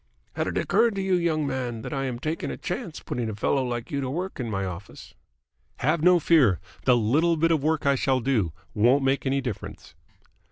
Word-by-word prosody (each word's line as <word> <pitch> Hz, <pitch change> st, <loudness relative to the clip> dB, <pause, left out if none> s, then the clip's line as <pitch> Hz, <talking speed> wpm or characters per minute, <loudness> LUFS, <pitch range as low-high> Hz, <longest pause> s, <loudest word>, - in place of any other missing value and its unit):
"Had -, -, -2 dB
it -, -, -2 dB
occurred 235 Hz, -3 st, +2 dB
to 195 Hz, -, -1 dB
you, 190 Hz, -1 st, 0 dB
young 165 Hz, -4 st, +1 dB
man, 125 Hz, -4 st, -3 dB
that -, -, -5 dB
I 135 Hz, -1 st, -1 dB
am 125 Hz, -2 st, -3 dB
taking 155 Hz, +6 st, -3 dB
a -, -, -5 dB
chance 175 Hz, -2 st, -5 dB
putting 120 Hz, -2 st, -3 dB
a 110 Hz, -, -5 dB
fellow 135 Hz, +6 st, +1 dB
like 120 Hz, -2 st, -4 dB
you 140 Hz, -1 st, -1 dB
to 130 Hz, -, -3 dB
work 180 Hz, +6 st, -4 dB
in 120 Hz, -3 st, -3 dB
my 95 Hz, -2 st, -2 dB
office?" 95 Hz, +2 st, -9 dB, 0.6 s
"Have 155 Hz, +4 st, +1 dB
no 180 Hz, +2 st, +6 dB
fear. 135 Hz, -, +4 dB, 0.3 s
The 125 Hz, -, +5 dB
little 155 Hz, +10 st, +2 dB
bit 165 Hz, +2 st, +2 dB
of 160 Hz, -3 st, +2 dB
work 155 Hz, +1 st, 0 dB
I 140 Hz, -, +4 dB
shall 135 Hz, -1 st, +1 dB
do 115 Hz, -9 st, 0 dB, 0.2 s
won't 125 Hz, +6 st, +3 dB
make 135 Hz, +1 st, +1 dB
any 135 Hz, +1 st, +1 dB
difference." 125 Hz, -7 st, -7 dB
135 Hz, 215 wpm, -25 LUFS, 120-160 Hz, 0.6 s, no